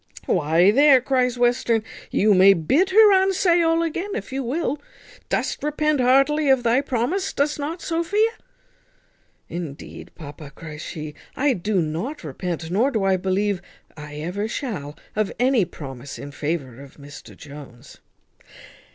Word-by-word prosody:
"Why, 170 Hz, +3 st, +3 dB
there," 280 Hz, +2 st, +6 dB
cries 250 Hz, -1 st, 0 dB
Western, 240 Hz, -2 st, +2 dB, 0.3 s
"you 210 Hz, +1 st, +3 dB
may 195 Hz, +1 st, +7 dB
bid 275 Hz, -, +2 dB
her 400 Hz, -1 st, +6 dB
unsay 370 Hz, -2 st, +2 dB
all 330 Hz, 0 st, +2 dB
again 340 Hz, +4 st, -3 dB
if 260 Hz, -, -6 dB
you 270 Hz, -, -2 dB
will. 285 Hz, +3 st, -2 dB, 0.5 s
Dost -, -, -1 dB
repent 300 Hz, 0 st, 0 dB
heartily 275 Hz, +4 st, +3 dB
of 265 Hz, -2 st, +4 dB
thy 240 Hz, +3 st, +3 dB
promise, 280 Hz, -, -1 dB
dost 295 Hz, +1 st, -1 dB
not, 320 Hz, +4 st, -4 dB
Sophia?" 380 Hz, +7 st, +1 dB, 1.2 s
"Indeed, 165 Hz, -5 st, -8 dB
papa," 145 Hz, -2 st, -10 dB
cries 155 Hz, -2 st, -9 dB
she, 155 Hz, -1 st, -7 dB, 0.2 s
"I 280 Hz, 0 st, +2 dB
do 190 Hz, -2 st, 0 dB
not 175 Hz, -, -4 dB
repent, 165 Hz, +2 st, -5 dB
nor 225 Hz, +9 st, +2 dB
do 220 Hz, -7 st, -1 dB
I 195 Hz, -1 st, +3 dB
believe 190 Hz, +1 st, -1 dB, 0.3 s
I 150 Hz, -1 st, -9 dB
ever 180 Hz, +8 st, -3 dB
shall, 170 Hz, -, -5 dB, 0.2 s
of 215 Hz, -2 st, 0 dB
any 250 Hz, -5 st, +3 dB
promise 135 Hz, -4 st, -9 dB
in 145 Hz, -, -8 dB
favour 145 Hz, -4 st, -4 dB
of 140 Hz, -1 st, -14 dB
Mr 145 Hz, 0 st, -12 dB
Jones." 140 Hz, -3 st, -13 dB
220 Hz, 145 wpm, -22 LUFS, -, 1.2 s, may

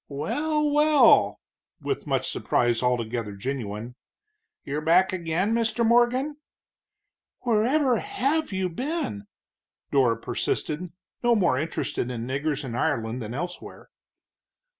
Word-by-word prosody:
"Well, 300 Hz, -, -1 dB
well!" 295 Hz, -4 st, +5 dB, 0.4 s
with -, -, -3 dB
much -, -, 0 dB
surprise 120 Hz, -1 st, +1 dB
altogether 120 Hz, -3 st, -1 dB
genuine, 115 Hz, 0 st, -5 dB, 0.7 s
"you're 145 Hz, +2 st, -3 dB
back 180 Hz, +4 st, +4 dB
again, 180 Hz, +4 st, 0 dB
Mr. 230 Hz, 0 st, +1 dB
Morgan?" 245 Hz, +5 st, +3 dB, 1.0 s
"Wherever 245 Hz, +3 st, +2 dB
have 320 Hz, -, -1 dB
you 190 Hz, -1 st, -1 dB
been?" 180 Hz, -, -4 dB, 0.6 s
Dora 125 Hz, -5 st, +3 dB
persisted, 165 Hz, +3 st, -2 dB, 0.3 s
no 240 Hz, -1 st, +3 dB
more 175 Hz, -, +2 dB
interested 155 Hz, -5 st, -2 dB
in 120 Hz, -2 st, -4 dB
niggers 145 Hz, +3 st, -2 dB
in 120 Hz, -, -5 dB
Ireland 115 Hz, 0 st, -1 dB
than 115 Hz, +2 st, -6 dB
elsewhere. 175 Hz, +4 st, -7 dB
170 Hz, 110 wpm, -25 LUFS, -, 1.0 s, well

